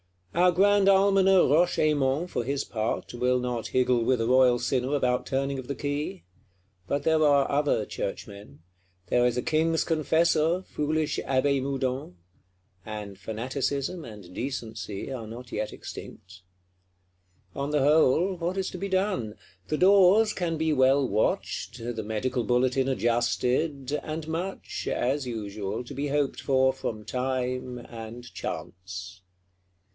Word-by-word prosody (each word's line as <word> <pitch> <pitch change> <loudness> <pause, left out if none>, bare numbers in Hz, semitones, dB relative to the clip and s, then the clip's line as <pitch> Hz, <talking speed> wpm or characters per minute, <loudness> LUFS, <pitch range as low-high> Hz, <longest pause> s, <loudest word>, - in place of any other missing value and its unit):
Our 180 +2 +4
Grand 200 +2 +4
Almoner 195 -1 +5
Roche 165 +6 +3
Aymon, 150 0 +2
for 150 -9 -3
his 140 +3 -1
part, 110 0 -3
will 125 +1 +1
not 125 -2 -2
higgle 125 -2 +2
with 125 +1 +2
a 115 - 0
royal 125 0 +5
sinner 125 +3 0
about 125 -3 0
turning 135 0 -1
of 125 - -8
the 140 - -3
key: 145 +7 -3 0.6
but 140 - -1
there 160 -1 +3
are 140 -2 +4
other 140 -6 +1
Churchmen; 100 -6 -7 0.5
there 120 0 +3
is 125 0 -1
a 125 - -1
King's 160 +1 +1
Confessor, 165 +2 +2
foolish 155 -2 -1
Abbé 135 +1 +2
Moudon; 130 -6 -2 0.7
and 105 -3 -7
Fanaticism 135 - -3
and 105 -7 -11
Decency 115 -3 -5
are 120 -4 -5
not 120 +2 -9
yet 105 0 -3
extinct. - - -10 1.1
On 140 +1 -3
the 150 -2 +2
whole, 160 +5 +4
what 175 +2 -3
is 190 -1 -1
to 180 - -7
be 200 +2 -3
done? 185 - 0 0.3
The 155 - -1
doors 200 +4 +5
can 170 -3 -2
be 160 0 +1
well 135 0 +4
watched; 105 0 -1
the 115 -1 -4
Medical 120 +4 -2
Bulletin 130 +2 +2
adjusted; 125 +3 0
and 155 0 -5
much, 175 +4 -4
as 130 +2 0
usual, 105 -2 -4
be 140 +3 -4
hoped 145 -1 0
for 130 -1 +3
from 115 -5 -5
time 125 0 -2
and 115 +1 -8
chance. 90 +1 -7
130 Hz, 140 wpm, -27 LUFS, 120-155 Hz, 1.1 s, Almoner